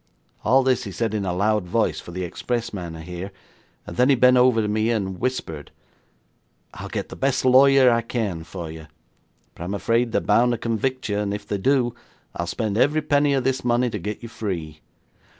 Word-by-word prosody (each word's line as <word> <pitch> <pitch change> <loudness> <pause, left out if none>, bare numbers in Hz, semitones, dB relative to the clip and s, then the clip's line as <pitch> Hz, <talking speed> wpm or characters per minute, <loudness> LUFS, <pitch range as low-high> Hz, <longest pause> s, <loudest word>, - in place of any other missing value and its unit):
'All 130 +4 +4
this 130 -2 +1
he 100 - -6
said 110 +3 -2
in 105 -2 -1
a 90 - -1
loud 100 +1 0
voice, 110 +5 0
for - - -11
the 90 +1 -4
expressman 100 -2 -4
to 80 - -8
hear, 90 +3 -7 0.6
then 125 +2 +2
he 140 - +6
bent 125 0 +5
over 125 -2 +4
to 105 - 0
me 110 +2 0
and 95 -5 -2
whispered: 80 - -3 1.0
'"I'll - - -8
get - - -4
the - - -8
best 135 -1 0
lawyer 130 0 +6
I 115 0 +2
can 110 -8 -3
for 85 -1 -7
you, 80 -1 -10 0.7
but - - -9
I'm 95 +4 -3
afraid 115 +3 +1
they're - - +2
bound 120 +1 +3
to - - -1
convict 130 +4 -2
you, 105 -1 -1
and 100 -1 -1
if 105 0 -8
they 100 -1 -3
do, 125 +1 +2 0.4
I - - -4
will 85 - -3
spend 110 +2 -2
every 150 +4 +3
penny 145 -1 +2
of 135 - 0
this 130 0 0
money 120 0 +1
to 105 - -4
get 105 +6 -5
you 115 - -7
free. 85 -9 -5
110 Hz, 210 wpm, -23 LUFS, 95-125 Hz, 1.0 s, he